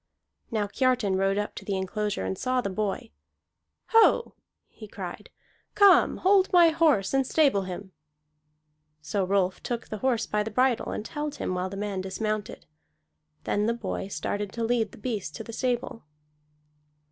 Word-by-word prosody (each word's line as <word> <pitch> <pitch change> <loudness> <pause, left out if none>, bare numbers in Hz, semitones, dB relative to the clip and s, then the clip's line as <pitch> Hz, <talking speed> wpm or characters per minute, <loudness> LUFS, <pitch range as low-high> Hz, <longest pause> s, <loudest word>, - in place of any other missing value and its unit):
Now 215 -3 0
Kiartan 240 -2 +1
rode 195 +1 +1
up 210 0 -2
to - - -8
the 195 -2 -2
enclosure 190 - -2
and 95 0 -2
saw 255 0 0
the 200 -5 -2
boy. 215 +4 -3 0.8
"Ho!" 455 +1 +4 0.3
he - - -12
cried, - - -8 0.5
"come 400 -3 +6
hold 385 0 +3
my 345 -2 +7
horse 310 - +2
and 270 0 +3
stable 265 -8 +2
him." 190 +1 -7 1.1
So 190 +6 -1
Rolf 185 -1 0
took 240 -1 -4
the 215 - -5
horse 255 -2 +1
by 210 - 0
the 215 - -3
bridle 250 +2 +1
and 215 - -4
held 295 -1 -4
him - - -3
while 180 +1 -2
the 195 - -7
man 200 -2 -3
dismounted. 205 - -4 0.8
Then 205 +1 0
the 230 - +1
boy 200 -4 -4
started 205 0 -3
to 230 - -3
lead 225 -2 +1
the - - -14
beast 210 -8 -4
to - - -6
the 230 - -9
stable. 240 - -2
215 Hz, 165 wpm, -27 LUFS, 195-255 Hz, 1.1 s, my